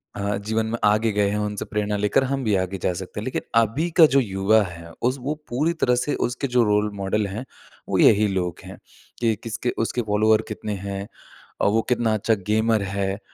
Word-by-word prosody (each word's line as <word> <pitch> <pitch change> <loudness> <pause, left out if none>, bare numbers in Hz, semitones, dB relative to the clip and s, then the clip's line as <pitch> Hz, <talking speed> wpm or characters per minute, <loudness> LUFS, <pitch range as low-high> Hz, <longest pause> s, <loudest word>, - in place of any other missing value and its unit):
अ, 100 0 -1
जीवन 110 +2 -1
में 115 +1 -2
आगे 105 +2 +3
गए 100 -1 +2
हैं 105 - -1
उनसे 105 -1 -3
प्रेरणा 105 0 -2
लेकर 105 +6 +2
हम 135 0 -2
भी 105 -3 +2
आगे 95 +1 -1
जा 90 - +1
सकते 95 +3 -6
हैं। 105 - -5
लेकिन 130 - -2 0.2
अभी 140 +11 -1
का 160 - +10
जो - - +7
युवा 105 -1 +2
है 85 -2 -9 0.2
उस 130 - -4
वो 145 +4 -2
पूरी 150 +8 0
तरह 125 0 +4
से 145 - -1
उसके 130 +3 -3
जो 120 - +6
रोल 105 0 +1
मॉडल 100 +1 0
हैं 110 +7 -6 0.4
वो - - +1
यही 105 0 +5
लोग 90 -3 -2
हैं - - -10 0.4
कि 115 -2 +2
किसके 115 +2 -3 0.2
उसके 120 - -2
फॉलोवर 110 +1 +4
कितने 105 0 -5
हैं 100 +1 -4 0.5
और - - +4
वो 115 +1 +2
कितना 115 -2 +2
अच्छा 110 +1 +1
गेमर 110 0 +2
है? 95 +1 -2
105 Hz, 210 wpm, -23 LUFS, 100-115 Hz, 0.5 s, का